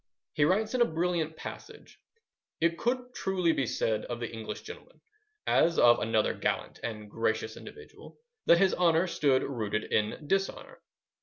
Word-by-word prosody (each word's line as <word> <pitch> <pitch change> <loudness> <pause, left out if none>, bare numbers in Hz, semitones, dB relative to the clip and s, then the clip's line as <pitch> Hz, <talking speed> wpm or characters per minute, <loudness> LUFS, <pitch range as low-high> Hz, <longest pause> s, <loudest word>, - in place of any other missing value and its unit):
He 145 - +3
writes 215 +7 +1
in 250 - +1
a - - +7
brilliant 165 -3 -1
passage:— - - -10 0.6
It 170 +1 +2
could 250 +1 -1
truly 185 -3 +1
be 135 -5 0
said 110 -1 -1
of 120 -1 -5
the 120 -1 -5
English 110 -1 -6
gentleman, 460 +2 -12 0.5
as 170 +1 +3
of 120 0 +6
another 110 0 +1
gallant - - -2
and 105 -2 -5
gracious 110 0 -2
individual, 440 0 -13 0.3
that 170 - +7
his 190 +1 +3
honour 170 -1 +3
stood 140 -6 +2
rooted 110 -5 -3
in 110 +8 0
dishonour. 195 +2 -2
160 Hz, 155 wpm, -29 LUFS, 115-190 Hz, 0.6 s, a